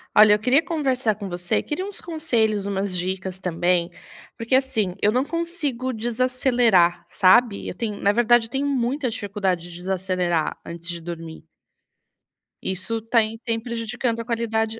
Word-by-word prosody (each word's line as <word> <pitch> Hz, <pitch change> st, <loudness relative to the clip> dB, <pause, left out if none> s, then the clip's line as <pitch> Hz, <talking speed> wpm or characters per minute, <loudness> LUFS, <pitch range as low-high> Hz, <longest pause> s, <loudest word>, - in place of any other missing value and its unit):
Olha, 210 Hz, 0 st, +8 dB
eu -, -, -3 dB
queria 255 Hz, +7 st, +3 dB
conversar 265 Hz, -, 0 dB
com 205 Hz, -1 st, -6 dB
você. 175 Hz, -1 st, -1 dB
Queria 300 Hz, +5 st, -3 dB
uns 405 Hz, 0 st, -6 dB
conselhos, 225 Hz, -, 0 dB
umas 195 Hz, -1 st, -2 dB
dicas 185 Hz, +1 st, -3 dB
também, 175 Hz, -1 st, 0 dB, 0.5 s
porque, 230 Hz, +3 st, -3 dB
assim, 255 Hz, -8 st, +1 dB
eu 210 Hz, -, +4 dB
não 255 Hz, +4 st, +1 dB
consigo 310 Hz, -7 st, -2 dB
desacelerar, 240 Hz, -6 st, +2 dB
sabe, 205 Hz, +3 st, +4 dB
eu -, -, -4 dB
tenho 210 Hz, +1 st, -4 dB
na 200 Hz, -, +3 dB
verdade, 240 Hz, +1 st, +4 dB
eu 225 Hz, -, -16 dB
tenho 275 Hz, +1 st, -1 dB
muita 260 Hz, 0 st, 0 dB
dificuldade 195 Hz, -5 st, -2 dB
de -, -, -9 dB
desacelerar 180 Hz, -3 st, -1 dB
antes 170 Hz, 0 st, -8 dB
de 170 Hz, 0 st, -4 dB
dormir. 165 Hz, -1 st, -8 dB, 1.2 s
Isso 200 Hz, +5 st, -1 dB
tá 230 Hz, +1 st, +3 dB
e 220 Hz, +1 st, -3 dB
tem 230 Hz, -1 st, -2 dB
prejudicando 235 Hz, 0 st, -2 dB
a -, -, -8 dB
qualidade 225 Hz, -1 st, -1 dB
220 Hz, 160 wpm, -23 LUFS, 185-250 Hz, 1.2 s, Olha